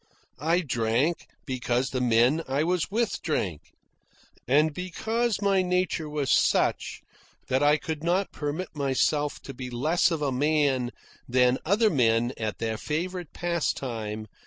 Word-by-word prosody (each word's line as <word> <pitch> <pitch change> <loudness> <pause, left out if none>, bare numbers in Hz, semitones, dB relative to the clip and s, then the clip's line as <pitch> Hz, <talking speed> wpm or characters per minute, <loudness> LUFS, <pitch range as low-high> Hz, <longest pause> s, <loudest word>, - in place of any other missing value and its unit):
I 165 +5 +2
drank 125 +3 0 0.2
because 125 -1 -1
the 130 - -1
men 125 +6 +3
I 135 +3 +1
was 175 0 0
with 225 +2 -1
drank, 95 - -3 0.8
and 150 +4 +3
because 220 +6 -2
my 195 -1 +3
nature 180 -3 0
was 150 -3 -1
such - - +2 0.5
that 130 +1 +2
I 145 +1 +5
could 155 0 -5
not 180 +3 +1
permit 155 +4 -4
myself 145 +1 0
to 135 - -8
be 130 -1 -6
less 150 +10 +2
of 160 -3 -2
a 140 - 0
man 140 -2 +1 0.4
than 125 0 +3
other 210 +5 +3
men 120 -2 +2
at 110 -1 -3
their 110 -1 -2
favourite 175 +2 -3
pastime. 120 -11 -2
150 Hz, 140 wpm, -27 LUFS, 125-175 Hz, 0.8 s, I